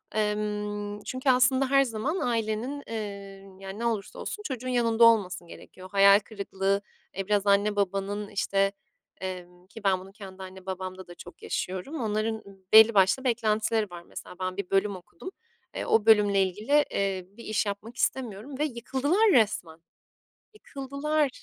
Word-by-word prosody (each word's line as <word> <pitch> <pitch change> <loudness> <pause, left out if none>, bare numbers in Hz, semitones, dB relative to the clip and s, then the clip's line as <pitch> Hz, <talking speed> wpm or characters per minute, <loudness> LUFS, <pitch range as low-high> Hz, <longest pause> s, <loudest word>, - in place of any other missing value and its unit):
ımm, 210 -1 -2
çünkü 255 +1 -2
aslında 260 +1 +4
her 275 0 +5
zaman 260 - -2
ailenin, 235 +4 -2
ııı, 195 -3 -7
yani, 195 +2 -7
ne 235 - -2
olursa 220 -4 -2
olsun 420 - -5
çocuğun 255 - -4
yanında 235 -2 +2
olması 190 -6 +4
gerekiyor. 185 +2 -13
Hayal 200 0 +7
kırıklığı, 200 -1 -2 0.4
e, 195 0 -3
biraz 205 -1 +1
anne 205 +1 +3
babanın, 200 +1 -1
işte, 195 0 +1 0.5
emm, 180 -1 -7
ki 215 +1 -12
ben 190 -2 +3
bunu 190 +1 -12
kendi 195 -2 -10
anne 190 0 -11
babamda 185 0 -6
da 175 - -11
çok 175 - -13
yaşıyorum. 190 - -4
Onların 220 0 -1 0.3
belli 220 +1 +9
başlı 195 +7 +4
beklentileri 220 -3 +1
var. 175 -1 -9
Mesela 180 - -10
ben 185 +1 -3
bir 200 -3 -4
bölüm 195 0 +1
okudum, 180 - -10 0.4
e, - - -4
o 220 -1 +3
bölümle 205 -3 +5
ilgili, 215 +11 +1
eee, 195 -2 -1
bir 235 - -10
iş 215 0 0
yapmak 205 +4 -5
istemiyorum 260 +2 -2
ve - - +2
yıkıldılar 285 - +1
resmen. 200 - +2 0.7
Yıkıldılar. 285 -3 -2
210 Hz, 155 wpm, -27 LUFS, 195-235 Hz, 0.7 s, belli